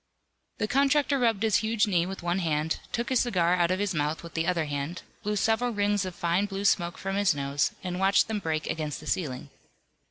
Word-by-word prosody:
The 210 - -1
contractor 280 +2 +2
rubbed 225 -4 +2
his 220 -3 +4
huge 220 0 +1
knee 180 -4 +1
with 190 -1 -7
one 175 +2 0
hand, 160 -2 0
took 235 0 -2
his 260 -2 +3
cigar 180 -8 +2
out 175 -1 +2
of 185 - +1
his 205 0 -1
mouth 150 +1 -1
with 170 - -10
the 165 0 -1
other 170 -3 +1
hand, 145 +4 -4 0.2
blew 210 0 -1
several 225 +4 +1
rings 205 -1 +1
of 185 -1 -6
fine 175 +4 +1
blue 195 0 -4
smoke 175 -3 +2
from 195 +1 -3
his 200 -5 +3
nose, 140 0 0
and 180 -1 -3
watched 195 +1 +4
them 220 -2 -2
break 160 -4 -2
against 155 -3 -3
the 155 - -12
ceiling. 140 -5 -3
185 Hz, 220 wpm, -27 LUFS, 165-205 Hz, 0.2 s, his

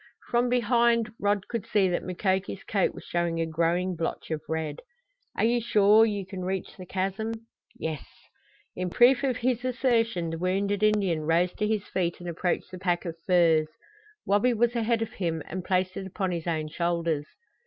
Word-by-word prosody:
From 245 +1 +2
behind 235 -2 +2
Rod 205 -1 0
could 230 -4 -4
see 200 -3 +3
that 175 - 0
Mukoki's 190 +1 -2
coat 195 -3 0
was - - -9
showing 170 -1 -1
a 165 - +1
growing 170 +3 0
blotch 165 0 -4
of 155 -1 -2
red. 160 -2 -2 0.6
"Are - - +1
you 235 +1 +3
sure 215 0 +5
you 205 -3 -3
can 190 -1 -6
reach 190 0 -3
the 185 -1 -10
chasm?" 195 +5 -2 0.4
"Yes." 160 -3 -4 0.7
In 180 0 -2
proof 245 +7 +5
of 260 -3 +1
his 250 -1 0
assertion 230 -9 +1
the 165 - -4
wounded 195 +3 0
Indian 200 -6 +2
rose 175 +2 +2
to 210 - -1
his 215 -2 -1
feet 175 -2 -1
and 175 - -8
approached 175 +1 -2
the 185 - -8
pack 175 -2 0
of 165 -2 -4
furs. 165 -4 +4 0.6
Wabi 210 +5 +3
was 240 +2 +2
ahead 230 0 +1
of 225 - -7
him, 165 -4 -2
and 185 +1 -5
placed 185 0 0
it 190 - -5
upon 190 0 -2
his 170 -1 -4
own 155 -2 -1
shoulders. 165 -2 -1
190 Hz, 185 wpm, -27 LUFS, 170-220 Hz, 0.7 s, sure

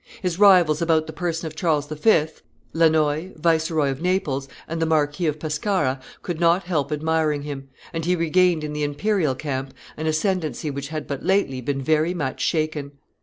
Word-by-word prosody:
His 180 -3 -2
rivals 180 -7 +6
about 160 -2 +2
the - - -8
person 170 -2 -3
of 155 -1 -6
Charles 155 -4 0
V., 155 +2 +3 0.5
Lannoy, 160 +1 +2
Viceroy 160 -3 +2
of 135 +2 -6
Naples, 165 -7 0 0.2
and 165 0 -4
the 165 - +2
Marquis 155 +1 +1
of 150 0 -1
Pescara, 150 -3 -1 0.2
could 175 -3 -4
not 170 +2 +3
help 155 -5 -1
admiring 155 -1 0
him, 140 -2 -7 0.2
and 165 0 -3
he 180 +2 +2
regained 170 0 +2
in 150 0 -4
the 150 - -3
imperial 150 0 0
camp 135 -1 -4 0.2
an 160 +1 -3
ascendency 155 - -1
which 140 0 -5
had 155 0 -5
but 140 -2 -5
lately 190 -10 +1
been 135 +2 -2
very 155 +4 +2
much 145 -6 -3
shaken. 155 -3 -1
155 Hz, 175 wpm, -23 LUFS, 145-170 Hz, 0.5 s, rivals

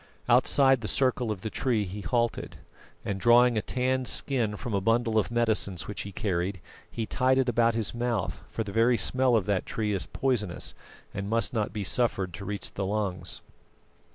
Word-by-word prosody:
Outside 130 +1 +4
the 105 - -4
circle 130 -2 +1
of 105 -4 -3
the 110 - -4
tree 115 -6 0
he 100 +3 -6
halted, 120 +1 -1 0.5
and 100 -1 -2
drawing 120 +1 +5
a 110 - +1
tanned 130 +1 -1
skin 115 -7 +1
from 120 - -5
a 100 - +1
bundle 115 +1 +2
of 105 - -1
medicines 110 -6 +1
which 105 -3 -5
he 100 - -7
carried, 95 -1 -2 0.3
he 115 - -4
tied 130 +4 +1
it 130 -1 +2
about 115 -1 +2
his 115 -3 0
mouth; 120 -4 -2
for 110 - -3
the 100 - -7
very 115 +3 +3
smell 130 0 +2
of 105 -5 +1
that 100 -3 -1
tree 110 -4 -2
is 95 - -3
poisonous 110 -9 -1 0.4
and 100 0 -4
must 115 +2 0
not 110 -5 -1
be 105 0 -4
suffered 100 -4 0
to 100 +3 -7
reach 100 0 -5
the 100 - -3
lungs. 100 -2 -3
110 Hz, 190 wpm, -27 LUFS, 100-120 Hz, 0.5 s, drawing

